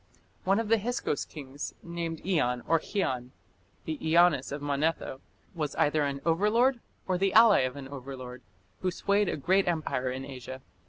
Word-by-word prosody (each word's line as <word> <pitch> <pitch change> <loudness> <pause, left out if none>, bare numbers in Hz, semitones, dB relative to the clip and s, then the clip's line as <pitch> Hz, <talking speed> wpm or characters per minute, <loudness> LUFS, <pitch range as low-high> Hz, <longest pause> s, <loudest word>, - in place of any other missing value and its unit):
One 195 +3 +3
of 225 - -2
the 225 0 +4
Hyksos 235 -8 -2
kings, 145 -1 -7
named 170 -2 -5
Ian 125 -10 +1
or 165 - +4
Khian, 130 - -2 0.6
the 155 -2 -3
Ianias 160 -3 +4
of 145 - -3
Manetho, 145 -1 -1 0.3
was 155 -5 -3
either 150 0 +2
an 140 -1 -3
overlord 215 +10 +3 0.3
or 185 -1 0
the 195 0 +2
ally 225 -2 +7
of 130 0 0
an 140 -1 -7
overlord, 130 -2 -8 0.4
who 185 - 0
swayed 200 +2 +1
a - - -2
great 190 +7 +2
empire 155 -6 -1
in 130 +1 -4
Asia. 130 -1 -8
155 Hz, 165 wpm, -29 LUFS, 135-190 Hz, 0.6 s, ally